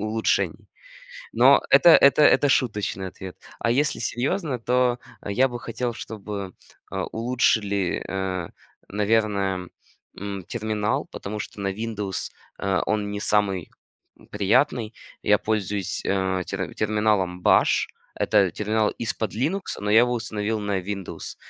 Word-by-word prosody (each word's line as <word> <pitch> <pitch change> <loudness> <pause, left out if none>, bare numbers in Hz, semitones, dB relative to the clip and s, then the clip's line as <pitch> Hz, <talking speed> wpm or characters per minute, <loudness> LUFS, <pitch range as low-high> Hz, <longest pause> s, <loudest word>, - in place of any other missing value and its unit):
улучшений. 110 +1 -1 0.6
Но - - +6
это 170 - +8
это 140 -2 +7
это 145 0 +5
шуточный 105 -7 0
ответ, 95 0 -9 0.2
а 115 - 0
если 145 +5 +1
серьезно, 135 - -1
то 125 +1 +1 0.3
я 125 +7 +2
бы 120 -1 -6
хотел, 120 +1 -3
чтобы, 100 -4 -6 0.4
а, - - -2
улучшили, 110 -5 0
а, 95 -2 -3 0.4
наверно, 100 -3 0 0.5
м, 100 0 -5
терминал. 110 -2 -1
Потому 105 +2 -6
что 105 - -7
на 100 - -1
Windows, 105 -2 -4 0.3
а, 95 -1 0
он 105 -1 -1
не 100 0 -4
самый, 100 -4 +1 0.5
м, - - -19
приятный. 110 +3 +1 0.3
Я 105 0 +4
пользуюсь, 105 -3 -2
а, 95 -1 0
тер - - -4
терминалом 105 -4 0
Bash. - - +4 0.3
Это 100 -4 +2
терминал 105 +3 0
из-под 110 -1 -3
Linux, 165 - -1 0.2
но 105 - -2
я 110 +2 +7
его 120 0 +2
установил 110 -2 -2
на 100 -2 -1
Windows. 95 0 -6
105 Hz, 130 wpm, -24 LUFS, 100-115 Hz, 0.6 s, это